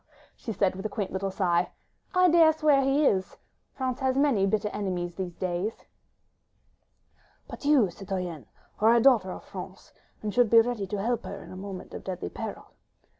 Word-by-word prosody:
." - - -30
she 225 - -3
said, 195 -3 +1
with 190 - -7
a 215 - -2
quaint 200 -2 -4
little 195 +1 -2
sigh, 180 -2 +1 0.5
"I 365 0 +6
dare 330 -2 +6
swear 305 -3 +3
he 275 +2 +2
is.... 190 -6 +1 0.4
France 260 -2 -2
has 265 -1 0
many 265 -9 +3
bitter 210 +1 0
enemies 180 -4 -3
these 180 -2 -5
days." 185 +4 -3 1.6
"But - - -9
you, 270 -11 +4
citoyenne, 180 -5 -5 0.3
are 225 +2 +5
a - - +5
daughter 225 -7 +4
of - - -8
France, 190 +1 -10 0.3
and 210 -1 -2
should 245 -3 +4
be 230 - +8
ready 225 -4 0
to 205 +1 -3
help 240 +1 0
her 200 - -7
in - - -12
a - - -8
moment 190 -1 -8
of - - -7
deadly 180 - -4
peril." - - -7
205 Hz, 185 wpm, -27 LUFS, 185-250 Hz, 1.6 s, be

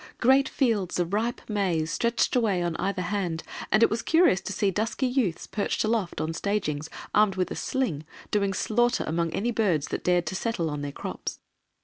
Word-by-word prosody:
Great 265 +2 +4
fields 220 - 0
of 175 +2 -1
ripe 230 +3 -1
maize 180 -7 0
stretched 235 +7 +1
away 205 -7 +2
on 170 -1 -1
either 195 -1 -1
hand, 180 -3 -2 0.3
and 215 +3 +5
it - - +6
was 225 +1 0
curious 325 - +4
to - - -5
see 200 0 +1
dusky 225 +7 -1
youths 245 -10 0
perched 205 - -1
aloft 215 -5 0
on 160 +1 -2
stagings, 160 -6 -2 0.2
armed 210 -2 +4
with 185 -1 -1
a - - -3
sling, 250 - -1 0.3
doing 200 -2 +2
slaughter 240 +5 +1
among 165 +1 -1
any 235 +4 -1
birds 185 -11 +1
that - - -3
dared 180 -1 +2
to 155 - -3
settle 185 -6 -1
on 145 -1 -4
their 145 0 -4
crops. - - -5
200 Hz, 195 wpm, -27 LUFS, 170-230 Hz, 0.3 s, it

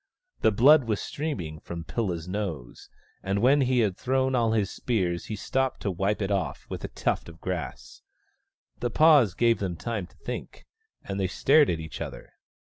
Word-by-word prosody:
The - - +4
blood 135 +6 +6
was 110 -3 -1
streaming 90 - -4
from 85 +1 -7
Pilla's 90 -4 -3
nose, 90 -10 -5 0.3
and 95 +1 -1
when 135 +6 +4
he 130 -2 +3
had 100 -5 +1
thrown 130 +3 0
all 115 -3 +2
his 105 -3 0
spears 90 -8 -1
he 110 - -4
stopped 130 +5 -1
to 100 - -1
wipe 100 +4 -1
it 95 - -2
off 90 -9 -2
with - - -5
a - - -2
tuft - - -2
of 80 0 -13
grass. 80 -10 -5 0.8
The 120 - -1
pause 145 - +5
gave 115 -1 +3
them 95 -3 -2
time 105 0 -4
to - - -25
think, - - -7 0.4
and 100 0 -4
they 95 - +1
stared 140 - +4
at 85 - -1
each 80 0 -7
other. 70 -7 -7
100 Hz, 185 wpm, -27 LUFS, 85-125 Hz, 0.8 s, blood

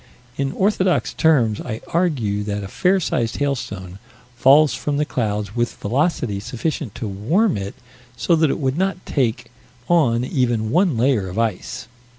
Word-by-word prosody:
In 135 0 -1
orthodox 190 -2 +1
terms 125 -10 +2
I 110 -2 -5
argue 135 - 0
that 105 -1 -3
a - - -5
fair 185 - +2
sized 120 -9 -1
hailstone 105 -10 -3 0.4
falls 140 +5 +5
from 145 -1 -2
the 150 - +1
clouds 105 -5 -2
with 120 0 -1
velocity 125 - -1
sufficient 125 +2 -4
to 115 -2 -4
warm 150 - +1
it 100 +1 -5 0.4
so 170 - +2
that 160 -1 +3
it - - 0
would 135 +2 -1
not 190 -1 -1
take 120 -3 -1 0.4
on 125 -8 +3
even 120 -4 0
one 175 - +2
layer 115 -6 +2
of 90 - -7
ice. 115 +3 -2
125 Hz, 160 wpm, -21 LUFS, 110-155 Hz, 0.4 s, falls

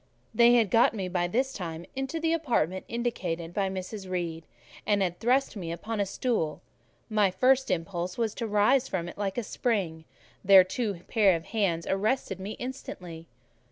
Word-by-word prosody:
They 240 0 +6
had 225 -5 +3
got 230 0 +4
me 190 -3 -3
by 175 -1 0
this 260 +8 0
time 170 -2 -6
into 270 +5 -3
the 325 0 +1
apartment 230 - 0
indicated 180 -8 -3
by 195 0 0
Mrs. 190 +1 -6
Reed, 170 -3 -3 0.4
and 205 -1 +2
had 175 -2 -2
thrust 255 +3 +2
me 175 -5 -5
upon 215 +6 -4
a 200 - +1
stool: 195 -8 -1 0.4
my 210 -3 +2 0.4
impulse 180 0 -2
was 225 -3 0
to 230 - -4
rise 220 +6 +3
from 175 -6 -3
it 175 - -9
like 195 0 -2
a 240 - 0
spring; 190 -9 -2 0.4
their 190 -1 +8
two 195 -1 -3
pair 200 -5 +4
of 165 0 -5
hands 195 -6 0
arrested 195 0 -1
me 200 +3 -5
instantly. 180 -10 -7
195 Hz, 170 wpm, -28 LUFS, 175-235 Hz, 0.4 s, their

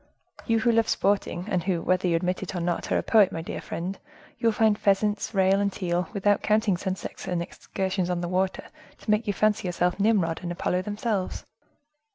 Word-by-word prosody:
You 230 - +3
who 235 - +3
love 225 -1 +2
sporting, 195 -3 0
and 185 -4 0
who, 185 -3 0
whether 185 0 +1
you 170 - +2
admit 180 +2 -1
it 190 0 -5
or - - -1
not, 175 0 -2
are - - +3
a - - -1
poet, 215 -4 +5
my 165 - -4
dear - - -5
friend, 185 +3 -5 0.4
you 230 - +1
will - - +5
find 220 -1 +3
pheasants, 205 +1 +1
rail 190 0 +4
and 200 0 +1
teal, 175 -3 -2
without 205 0 +2
counting 215 -2 +2
sunsets 190 +1 -5
and 180 -1 -1
excursions 185 +1 -3
on 180 -1 0
the 175 - -2
water, 185 +1 -1 0.3
to 215 - -3
make 215 +2 +1
you 205 - +1
fancy 210 -2 +1
yourself 180 +1 0
Nimrod 195 -6 +2
and 175 -1 -4
Apollo 180 +1 -1
themselves. 205 -1 -3
190 Hz, 205 wpm, -26 LUFS, 180-210 Hz, 0.4 s, poet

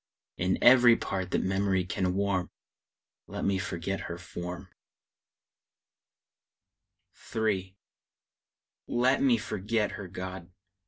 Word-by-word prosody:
In 90 +1 +1
every 120 -1 +8
part 95 -5 -3
that - - 0
memory 95 -1 +1
can 90 +1 -1
warm, 95 -2 0 0.8
Let - - -4
me 95 -1 +1
forget 90 +1 -3
her 85 - -6
form! 90 +1 -7 2.7
III. 100 -4 -1 1.1
Let 125 +3 +2
me 130 -4 +4
forget 105 0 -1
her, 100 - -7
God! 95 -1 -7
95 Hz, 100 wpm, -29 LUFS, 90-105 Hz, 2.7 s, every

